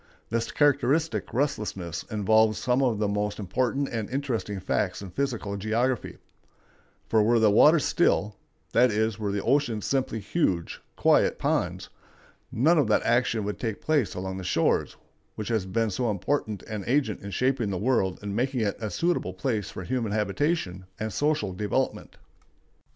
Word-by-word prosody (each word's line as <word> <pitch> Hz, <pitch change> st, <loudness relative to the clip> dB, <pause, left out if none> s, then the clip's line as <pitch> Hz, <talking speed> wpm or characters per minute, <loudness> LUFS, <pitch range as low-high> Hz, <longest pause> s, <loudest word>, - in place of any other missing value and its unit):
This 115 Hz, 0 st, -1 dB
characteristic 145 Hz, +2 st, +1 dB
restlessness 105 Hz, -, -2 dB
involves 110 Hz, 0 st, +3 dB
some 125 Hz, +2 st, +1 dB
of 125 Hz, -5 st, +2 dB
the 105 Hz, 0 st, 0 dB
most 105 Hz, 0 st, -1 dB
important 125 Hz, +7 st, -1 dB
and 110 Hz, -3 st, -3 dB
interesting 125 Hz, -7 st, -2 dB
facts 95 Hz, 0 st, -1 dB
in 95 Hz, -, -8 dB
physical 120 Hz, -5 st, -2 dB
geography; 115 Hz, +4 st, -1 dB, 0.9 s
for 110 Hz, -, +3 dB
were 115 Hz, +3 st, +3 dB
the 110 Hz, -2 st, +4 dB
waters 150 Hz, +8 st, +6 dB
still,—that 120 Hz, -, +1 dB
is, 110 Hz, 0 st, 0 dB
were 105 Hz, -2 st, -1 dB
the 100 Hz, 0 st, -2 dB
oceans 125 Hz, -5 st, +1 dB
simply 130 Hz, -4 st, -1 dB
huge, 100 Hz, -, -1 dB
quiet -, -, +3 dB
ponds,—none 155 Hz, +8 st, -1 dB
of 140 Hz, -, +2 dB
that 105 Hz, -, +2 dB
action 120 Hz, -2 st, +1 dB
could 105 Hz, 0 st, -4 dB
take 110 Hz, -4 st, -3 dB
place 150 Hz, -8 st, 0 dB
along 95 Hz, +1 st, -4 dB
the 95 Hz, -, -6 dB
shores 85 Hz, -2 st, +1 dB, 0.4 s
which 105 Hz, 0 st, -5 dB
has 110 Hz, -5 st, 0 dB
been 110 Hz, +3 st, 0 dB
so 120 Hz, +5 st, -1 dB
important 105 Hz, +1 st, -2 dB
an 105 Hz, -2 st, -5 dB
agent 130 Hz, -4 st, +1 dB
in 100 Hz, -, -7 dB
shaping 125 Hz, 0 st, 0 dB
the 95 Hz, -, -2 dB
world 100 Hz, -4 st, +1 dB
and 100 Hz, -1 st, -4 dB
making 125 Hz, +1 st, 0 dB
it 105 Hz, 0 st, -2 dB
a 110 Hz, -, -2 dB
suitable 170 Hz, -, -1 dB
place 105 Hz, -2 st, -2 dB
for 90 Hz, -, -7 dB
human 115 Hz, -1 st, -2 dB
habitation 105 Hz, -, -1 dB
and 110 Hz, -1 st, -3 dB
social 145 Hz, -10 st, 0 dB
development. 105 Hz, +2 st, -2 dB
110 Hz, 155 wpm, -26 LUFS, 100-130 Hz, 0.9 s, waters